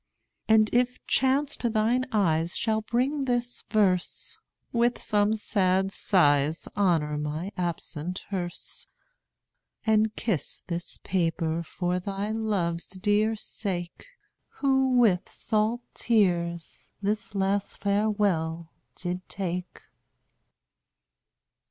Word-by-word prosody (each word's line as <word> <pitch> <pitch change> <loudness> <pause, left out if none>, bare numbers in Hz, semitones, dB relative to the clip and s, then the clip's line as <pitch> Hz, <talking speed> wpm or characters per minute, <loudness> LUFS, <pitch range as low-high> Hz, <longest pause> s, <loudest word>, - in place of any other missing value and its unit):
And 220 -1 +6
if 250 +1 +2
chance 270 +2 +2
to 235 - 0
thine 230 +4 +1
eyes 170 -6 +1
shall 220 -1 +1
bring 265 +6 0
this 245 -1 -1
verse, 195 -4 +1 0.3
With 240 +1 +2
some 210 +1 +2
sad 195 -2 +1
sighs 150 -6 +2
honor 165 -7 +2
my 155 +6 -3
absent 175 -1 -4
hearse; 175 -3 -4 1.0
And 220 -1 +3
kiss 210 - -2
this 170 -1 -4
paper 165 -2 0
for 175 +2 -2
thy 200 +2 -3
dear - - -2
love's 205 +2 0
sake, 175 -4 -4 0.5
Who 265 -1 +2
with 205 -7 +3
salt 220 +2 0
tears 175 -7 0
this 210 +1 -1
last 195 +1 0
farewell 200 -6 +1 0.2
did 180 0 -5
take. 180 -2 -4
200 Hz, 100 wpm, -27 LUFS, 175-220 Hz, 1.0 s, And